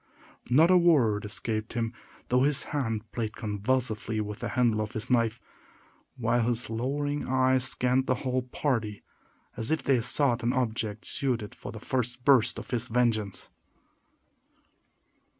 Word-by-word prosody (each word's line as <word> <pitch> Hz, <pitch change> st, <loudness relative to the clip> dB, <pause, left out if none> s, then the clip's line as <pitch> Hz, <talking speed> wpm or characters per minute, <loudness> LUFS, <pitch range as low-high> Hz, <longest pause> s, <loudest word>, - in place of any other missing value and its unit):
Not 155 Hz, +8 st, +5 dB
a 185 Hz, -, +7 dB
word 125 Hz, -12 st, +3 dB
escaped 110 Hz, +1 st, -3 dB
him, 115 Hz, -1 st, -2 dB, 0.4 s
though 125 Hz, +1 st, +3 dB
his 140 Hz, 0 st, +2 dB
hand 115 Hz, -7 st, -1 dB
played 110 Hz, -3 st, -3 dB
convulsively 110 Hz, +1 st, -1 dB
with 105 Hz, -1 st, -4 dB
the -, -, -3 dB
handle 120 Hz, -4 st, +2 dB
of 105 Hz, -1 st, -4 dB
his 110 Hz, +3 st, -2 dB
knife, 115 Hz, -2 st, +2 dB, 0.8 s
while 120 Hz, 0 st, +1 dB
his 120 Hz, -1 st, -1 dB
lowering 145 Hz, +5 st, -2 dB
eyes 130 Hz, 0 st, +2 dB
scanned 125 Hz, +2 st, +1 dB
the 130 Hz, -, +2 dB
whole 130 Hz, 0 st, +1 dB
party, 120 Hz, -5 st, -2 dB, 0.5 s
as 115 Hz, -, -3 dB
if 160 Hz, -, 0 dB
they 130 Hz, -4 st, +2 dB
sought 125 Hz, 0 st, +3 dB
an 120 Hz, +2 st, 0 dB
object 110 Hz, -5 st, -2 dB
suited 120 Hz, -6 st, -1 dB
to -, -, -10 dB
the 110 Hz, -, -8 dB
first 125 Hz, 0 st, -2 dB
burst 125 Hz, -4 st, +4 dB
of -, -, -8 dB
his 120 Hz, 0 st, 0 dB
vengeance. 110 Hz, -4 st, 0 dB
120 Hz, 150 wpm, -28 LUFS, 110-130 Hz, 0.8 s, a